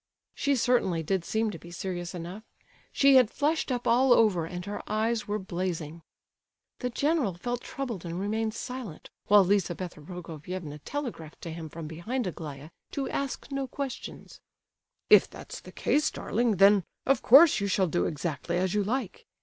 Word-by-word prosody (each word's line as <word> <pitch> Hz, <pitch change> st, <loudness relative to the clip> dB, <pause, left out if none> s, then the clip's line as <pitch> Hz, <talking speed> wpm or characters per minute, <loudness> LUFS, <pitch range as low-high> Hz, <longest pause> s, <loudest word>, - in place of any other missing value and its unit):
She 280 Hz, -1 st, +1 dB
certainly 230 Hz, -9 st, +2 dB
did 185 Hz, +2 st, 0 dB
seem 220 Hz, +3 st, 0 dB
to 170 Hz, -, -8 dB
be 170 Hz, -, -12 dB
serious 175 Hz, 0 st, -5 dB
enough. 175 Hz, +4 st, -6 dB, 0.5 s
She 275 Hz, -1 st, +6 dB
had 250 Hz, -4 st, +5 dB
flushed 300 Hz, +2 st, 0 dB
up 245 Hz, -1 st, -2 dB
all 250 Hz, +2 st, +5 dB
over 195 Hz, -9 st, +3 dB
and 180 Hz, +1 st, -6 dB
her 205 Hz, -, -5 dB
eyes 220 Hz, +1 st, 0 dB
were 210 Hz, +1 st, -1 dB
blazing. 175 Hz, -4 st, -4 dB, 0.8 s
The 250 Hz, -, -2 dB
general 280 Hz, -, +1 dB
felt 245 Hz, +7 st, -3 dB
troubled 240 Hz, -10 st, -5 dB
and 170 Hz, 0 st, -4 dB
remained 220 Hz, +2 st, -1 dB
silent, 250 Hz, -, -7 dB, 0.2 s
while 205 Hz, -1 st, +7 dB
Lizabetha 180 Hz, -3 st, -1 dB
Prokofievna 165 Hz, -1 st, -7 dB
telegraphed 240 Hz, -, -5 dB
to 165 Hz, -, -6 dB
him 160 Hz, -1 st, -7 dB
from 165 Hz, +1 st, -7 dB
behind 190 Hz, +11 st, -3 dB
Aglaya 155 Hz, -4 st, -7 dB, 0.2 s
to 275 Hz, -1 st, -2 dB
ask 275 Hz, +1 st, -3 dB
no 275 Hz, -1 st, -2 dB
questions. 270 Hz, -1 st, -6 dB, 0.7 s
"If -, -, +8 dB
that's -, -, -9 dB
the -, -, -12 dB
case, 300 Hz, +1 st, +1 dB
darling—then, 205 Hz, -3 st, +3 dB, 0.2 s
of 270 Hz, -2 st, +3 dB
course, 290 Hz, +6 st, +7 dB
you 200 Hz, -, 0 dB
shall 190 Hz, -1 st, +2 dB
do 175 Hz, +1 st, 0 dB
exactly 170 Hz, +2 st, -3 dB
as 185 Hz, 0 st, 0 dB
you 210 Hz, -1 st, +2 dB
like. 230 Hz, 0 st, -3 dB
200 Hz, 165 wpm, -28 LUFS, 170-245 Hz, 0.8 s, If